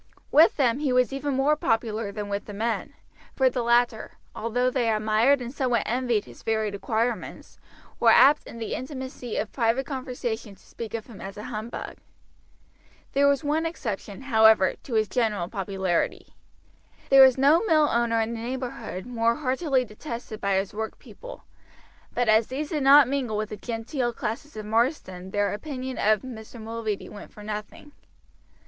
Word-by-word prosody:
With 315 Hz, +3 st, +6 dB
them 255 Hz, -3 st, +2 dB
he 290 Hz, -3 st, 0 dB
was 250 Hz, +1 st, +2 dB
even 275 Hz, 0 st, -2 dB
more 280 Hz, +3 st, +3 dB
popular 225 Hz, -6 st, -1 dB
than 205 Hz, 0 st, -5 dB
with 200 Hz, 0 st, -3 dB
the 205 Hz, -, -8 dB
men, 225 Hz, +2 st, -2 dB, 0.4 s
for 260 Hz, -1 st, +3 dB
the 245 Hz, -, -1 dB
latter, 235 Hz, -1 st, +1 dB, 0.2 s
although 245 Hz, +3 st, 0 dB
they 245 Hz, -3 st, +1 dB
admired 220 Hz, +5 st, +3 dB
and 240 Hz, +1 st, -7 dB
somewhat 255 Hz, -4 st, +1 dB
envied 240 Hz, -3 st, 0 dB
his -, -, -14 dB
varied 220 Hz, -2 st, -1 dB
acquirements, 225 Hz, +4 st, -3 dB, 0.4 s
were -, -, +5 dB
apt 290 Hz, +3 st, +6 dB
in -, -, -9 dB
the 225 Hz, -1 st, -4 dB
intimacy 260 Hz, -3 st, -6 dB
of 210 Hz, -, -2 dB
private 240 Hz, +2 st, +1 dB
conversation 245 Hz, -6 st, -5 dB
to -, -, -24 dB
speak 230 Hz, -1 st, -7 dB
of 220 Hz, -, -5 dB
him 225 Hz, -5 st, -12 dB
as 195 Hz, +1 st, -8 dB
a 210 Hz, -, -7 dB
humbug. 215 Hz, +2 st, -6 dB, 1.2 s
There 280 Hz, +1 st, +4 dB
was 280 Hz, +1 st, +2 dB
one 300 Hz, +2 st, 0 dB
exception, 215 Hz, -, -5 dB
however, 220 Hz, -6 st, +5 dB
to 240 Hz, -, -5 dB
his 215 Hz, -1 st, +2 dB
general 210 Hz, -6 st, 0 dB
popularity. 190 Hz, -3 st, -2 dB, 0.8 s
There 270 Hz, 0 st, +9 dB
was 265 Hz, -1 st, +7 dB
no 290 Hz, +7 st, +5 dB
mill 310 Hz, -6 st, +4 dB
owner 235 Hz, 0 st, +1 dB
in 225 Hz, +1 st, -2 dB
the 230 Hz, -, -5 dB
neighborhood 235 Hz, -5 st, -5 dB
more 235 Hz, -1 st, +1 dB
heartily 265 Hz, -1 st, 0 dB
detested 230 Hz, -1 st, -8 dB
by 200 Hz, -1 st, +1 dB
his 195 Hz, 0 st, -1 dB
workpeople; 220 Hz, -, -8 dB, 0.7 s
but 245 Hz, -, 0 dB
as 220 Hz, +1 st, +4 dB
these 290 Hz, +3 st, -4 dB
did 305 Hz, -3 st, -1 dB
not 275 Hz, 0 st, +7 dB
mingle 255 Hz, -5 st, -1 dB
with 215 Hz, 0 st, -2 dB
the -, -, -5 dB
genteel 240 Hz, +3 st, -3 dB
classes 235 Hz, +5 st, -5 dB
of 215 Hz, -, -6 dB
Marsden 215 Hz, -, -1 dB
their 205 Hz, +1 st, 0 dB
opinion 260 Hz, +2 st, -5 dB
of 215 Hz, -1 st, +2 dB
Mr. 235 Hz, -2 st, -9 dB
Mulready 220 Hz, -2 st, -4 dB
went 205 Hz, -, -11 dB
for 210 Hz, -, -12 dB
nothing. 210 Hz, +7 st, -7 dB
235 Hz, 170 wpm, -26 LUFS, 215-265 Hz, 1.2 s, There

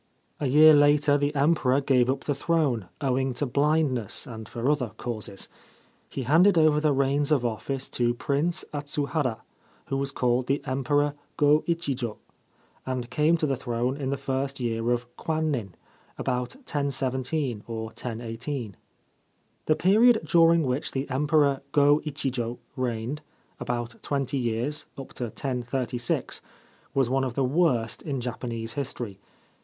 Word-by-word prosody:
A 145 Hz, -, 0 dB
year 155 Hz, +4 st, +8 dB
later 145 Hz, 0 st, +5 dB
the 145 Hz, +1 st, 0 dB
Emperor 140 Hz, -2 st, +3 dB
gave 130 Hz, -3 st, +3 dB
up 135 Hz, +1 st, -1 dB
the 145 Hz, -, 0 dB
throne, 140 Hz, -, 0 dB
owing 130 Hz, -1 st, 0 dB
to 145 Hz, -, 0 dB
blindness 140 Hz, -4 st, +1 dB
and 110 Hz, -3 st, -8 dB
for 120 Hz, +2 st, -3 dB
other 140 Hz, -6 st, +1 dB
causes. 110 Hz, -5 st, -5 dB, 0.6 s
He 135 Hz, -, -4 dB
handed 170 Hz, -, +5 dB
over 155 Hz, -2 st, +5 dB
the 155 Hz, -1 st, +3 dB
reins 140 Hz, +2 st, +1 dB
of 135 Hz, -5 st, +3 dB
office 130 Hz, +4 st, -3 dB
to 120 Hz, -1 st, 0 dB
Prince 145 Hz, +7 st, 0 dB
Atsuhara, 145 Hz, -4 st, -1 dB, 0.5 s
who 135 Hz, -, 0 dB
was 135 Hz, 0 st, -1 dB
called 125 Hz, -1 st, 0 dB
the 140 Hz, +2 st, +1 dB
Emperor 145 Hz, +2 st, +1 dB, 0.2 s
Go 150 Hz, +1 st, +4 dB
Ichijo, 140 Hz, -9 st, -2 dB, 0.7 s
and 130 Hz, -2 st, -4 dB
came 155 Hz, +3 st, +3 dB
to 160 Hz, -, 0 dB
the 140 Hz, -2 st, +1 dB
throne 125 Hz, 0 st, -2 dB
in 140 Hz, -2 st, -3 dB
the 140 Hz, -, -1 dB
first 135 Hz, 0 st, -2 dB
year 115 Hz, -1 st, -1 dB
of 120 Hz, 0 st, +1 dB
Kwannin, 150 Hz, -, -2 dB, 0.4 s
about 125 Hz, 0 st, -2 dB
1017 135 Hz, -, -2 dB
or 115 Hz, -1 st, -4 dB
1018. 115 Hz, 0 st, -5 dB, 0.9 s
The 155 Hz, -, +4 dB
period 220 Hz, +7 st, +5 dB
during 165 Hz, -1 st, +5 dB
which 130 Hz, +1 st, -2 dB
the 135 Hz, +1 st, -2 dB
Emperor 145 Hz, 0 st, +2 dB
Go 145 Hz, +1 st, +5 dB
Ichijo 125 Hz, -5 st, -3 dB, 0.2 s
reigned 125 Hz, +3 st, -2 dB, 0.2 s
— -, -, -38 dB
about 120 Hz, -1 st, -4 dB
twenty 140 Hz, -1 st, -1 dB
years, 120 Hz, +5 st, -2 dB
up 135 Hz, -, -9 dB
to 125 Hz, -, -3 dB
1036 125 Hz, 0 st, -2 dB, 0.3 s
— -, -, -32 dB
was 135 Hz, -3 st, +3 dB
one 135 Hz, +2 st, +1 dB
of 125 Hz, -3 st, -3 dB
the 135 Hz, -, +1 dB
worst 130 Hz, -5 st, +1 dB
in 140 Hz, -3 st, -3 dB
Japanese 120 Hz, -2 st, -4 dB
history. 120 Hz, -7 st, -4 dB
135 Hz, 150 wpm, -26 LUFS, 120-145 Hz, 0.9 s, year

